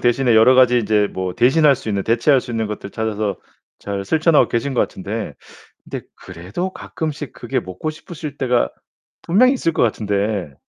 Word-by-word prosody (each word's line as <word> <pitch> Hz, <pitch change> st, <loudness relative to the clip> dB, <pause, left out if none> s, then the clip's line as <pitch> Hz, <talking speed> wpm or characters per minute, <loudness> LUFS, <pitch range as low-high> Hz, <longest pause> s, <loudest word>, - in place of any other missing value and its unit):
대신에 120 Hz, 0 st, +2 dB
여러 115 Hz, +4 st, +6 dB
가지 125 Hz, -1 st, +5 dB
인제 105 Hz, -1 st, +1 dB
뭐 95 Hz, -1 st, -4 dB
대신할 140 Hz, +3 st, +4 dB
수 110 Hz, -, -8 dB
있는 100 Hz, -2 st, -1 dB
대체할 120 Hz, +4 st, +3 dB
수 125 Hz, -, -10 dB
있는 115 Hz, -2 st, -1 dB
것들 105 Hz, -1 st, -6 dB
찾아서 110 Hz, -3 st, -2 dB, 0.4 s
잘 100 Hz, -1 st, -4 dB
실천하고 160 Hz, -, +3 dB
계신 125 Hz, +3 st, -2 dB
것 -, -, +2 dB
같은데 105 Hz, +3 st, -3 dB, 0.5 s
근데 -, -, -7 dB
그래도 95 Hz, -, -6 dB
가끔씩 155 Hz, -5 st, -5 dB
그게 -, -, -3 dB
먹고 95 Hz, -, -5 dB
싶으실 155 Hz, -2 st, -9 dB
때가 125 Hz, -2 st, +1 dB, 0.5 s
분명히 250 Hz, +10 st, +4 dB
있을 165 Hz, -10 st, 0 dB
것 -, -, 0 dB
같은데. 105 Hz, -, -1 dB
115 Hz, 360 characters per minute, -20 LUFS, 100-140 Hz, 0.5 s, 여러